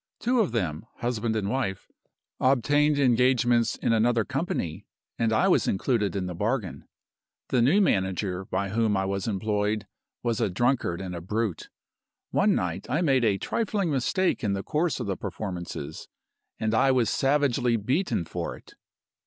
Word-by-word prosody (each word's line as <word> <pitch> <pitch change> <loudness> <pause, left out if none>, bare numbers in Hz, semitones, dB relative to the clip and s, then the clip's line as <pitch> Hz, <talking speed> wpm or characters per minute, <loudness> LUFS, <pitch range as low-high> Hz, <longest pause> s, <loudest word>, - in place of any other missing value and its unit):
Two 245 +1 +1
of 215 - +2
them 90 -3 -2
(husband 115 -2 -2
and 105 -3 -1
wife) 110 -5 -2 0.5
obtained 145 +3 +3
engagements 120 -2 +3
in - - 0
another 115 0 +2
company, 135 - -3 0.3
and 115 -1 +2
I 110 - +3
was - - +3
included 105 0 0
in 95 -2 -1
the 90 - -4
bargain 105 +2 -2 0.6
The 125 - +2
new 145 - +4
manager 95 - 0
by 95 +1 -2
whom 110 0 +1
I 95 - 0
was 100 +1 -2
employed 105 0 -1 0.4
was 115 -3 0
a - - +2
drunkard 110 -3 0
and 95 -2 -5
a 85 - -5
brute. 105 0 -2 0.6
One - - +3
night 90 +5 -3
I 150 +7 +1
made 135 -5 +3
a 105 -4 +3
trifling 200 - -1
mistake 150 +6 0
in 100 -2 +1
the 100 0 -3
course 160 0 0
of 120 - -3
the 100 -1 -1
performances 90 -7 -6 0.5
and 110 0 0
I 125 +4 +4
was 125 -4 +3
savagely 135 -2 +2
beaten 125 - 0
for - - -5
it. - - -18
115 Hz, 160 wpm, -26 LUFS, 100-130 Hz, 0.6 s, new